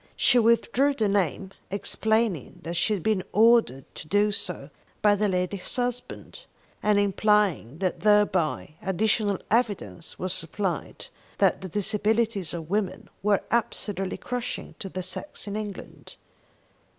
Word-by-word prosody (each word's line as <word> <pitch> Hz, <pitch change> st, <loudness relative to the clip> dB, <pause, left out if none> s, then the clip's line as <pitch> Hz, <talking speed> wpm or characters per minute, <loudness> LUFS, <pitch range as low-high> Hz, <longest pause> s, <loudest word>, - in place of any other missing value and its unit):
She 250 Hz, -, +5 dB
withdrew 235 Hz, +5 st, +3 dB
the 220 Hz, -5 st, +1 dB
name, 195 Hz, -1 st, 0 dB, 0.2 s
explaining 220 Hz, -, 0 dB
that 170 Hz, -, -4 dB
she 175 Hz, +5 st, +1 dB
had 180 Hz, -, -6 dB
been 215 Hz, -3 st, +2 dB
ordered 220 Hz, -, +4 dB
to -, -, -9 dB
do 205 Hz, +4 st, +3 dB
so 205 Hz, -, -4 dB, 0.3 s
by 210 Hz, -1 st, +6 dB
the 210 Hz, +1 st, +1 dB
lady's 180 Hz, 0 st, -2 dB
husband, 245 Hz, -, -4 dB, 0.3 s
and 210 Hz, -1 st, +3 dB
implying 200 Hz, -, +2 dB
that 185 Hz, 0 st, -1 dB
thereby 205 Hz, -8 st, +2 dB
additional 205 Hz, +2 st, +1 dB
evidence 205 Hz, -, -1 dB
was 185 Hz, 0 st, -2 dB
supplied 185 Hz, 0 st, -3 dB, 0.3 s
that -, -, +3 dB
the 190 Hz, -, -6 dB
Disabilities 210 Hz, 0 st, 0 dB
of 165 Hz, -2 st, -5 dB
Women 205 Hz, -1 st, -2 dB
were 205 Hz, -1 st, +2 dB
absolutely 205 Hz, -4 st, -1 dB
crushing 245 Hz, -1 st, -4 dB
to 195 Hz, -, -5 dB
the 185 Hz, 0 st, -5 dB
sex 185 Hz, +11 st, -6 dB
in 205 Hz, -1 st, -5 dB
England. 210 Hz, -2 st, -7 dB
205 Hz, 135 wpm, -26 LUFS, 185-220 Hz, 0.3 s, by